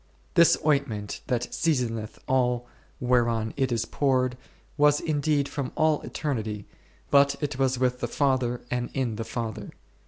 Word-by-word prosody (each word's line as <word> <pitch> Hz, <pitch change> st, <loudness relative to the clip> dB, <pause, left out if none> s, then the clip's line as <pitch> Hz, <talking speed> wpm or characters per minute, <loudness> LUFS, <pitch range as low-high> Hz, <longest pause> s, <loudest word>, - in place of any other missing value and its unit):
This 170 Hz, -1 st, +6 dB
ointment, 140 Hz, -9 st, 0 dB
that 125 Hz, -1 st, -1 dB
seasoneth 120 Hz, -9 st, -1 dB
all 125 Hz, -2 st, +1 dB, 0.3 s
whereon 120 Hz, -3 st, +1 dB
it 135 Hz, -2 st, 0 dB
is 115 Hz, -1 st, 0 dB
poured, 130 Hz, -2 st, +1 dB, 0.4 s
was 145 Hz, 0 st, +4 dB
indeed 145 Hz, -2 st, +1 dB
from 140 Hz, -3 st, -4 dB
all 155 Hz, -1 st, +2 dB
eternity, 110 Hz, -8 st, -3 dB, 0.5 s
but 140 Hz, 0 st, +5 dB
it 145 Hz, -3 st, -3 dB
was 130 Hz, -1 st, +2 dB
with 125 Hz, 0 st, +1 dB
the -, -, -1 dB
Father 130 Hz, -4 st, 0 dB
and 125 Hz, -1 st, -1 dB
in 125 Hz, -5 st, -1 dB
the 115 Hz, -, -2 dB
Father. 115 Hz, -2 st, -5 dB
125 Hz, 145 wpm, -26 LUFS, 120-140 Hz, 0.5 s, This